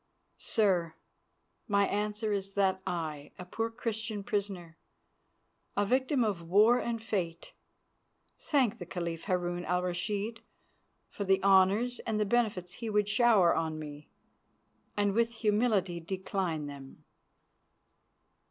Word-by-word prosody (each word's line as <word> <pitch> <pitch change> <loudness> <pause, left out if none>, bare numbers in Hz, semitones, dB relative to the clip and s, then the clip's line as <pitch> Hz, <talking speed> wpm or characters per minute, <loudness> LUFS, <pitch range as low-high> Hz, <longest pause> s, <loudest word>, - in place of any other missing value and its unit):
"Sir, 180 -7 +1 0.7
my 200 -2 +3
answer 210 +1 -1
is 195 -1 -3
that 190 -1 +2
I, 155 -4 -4
a 180 - -8
poor 225 +5 -2
Christian 220 -3 -4
prisoner, 195 -5 -3 1.0
a 205 - +3
victim 260 +3 +2
of 205 -6 -1
war 210 +8 +5
and 235 -1 -2
fate, 185 -7 -3 0.9
thank 250 -6 +1
the - - -7
Caliph 170 -2 -4
Harun 175 -2 -1
al 180 0 0
Rashid 205 +5 -2 0.7
for 205 - -5
the 190 -1 +2
honours 200 +5 +4
and 220 -2 -2
the 210 - +2
benefits 200 -5 0
he 230 +2 -5
would 210 -1 +2
shower 215 -5 +5
on 160 -1 -1
me, 150 -1 -9 0.9
and 205 -1 +2
with 230 +2 +1
humility 210 -5 +1
decline 185 -2 -3
them." 140 -2 -10
200 Hz, 125 wpm, -31 LUFS, 175-220 Hz, 1.0 s, war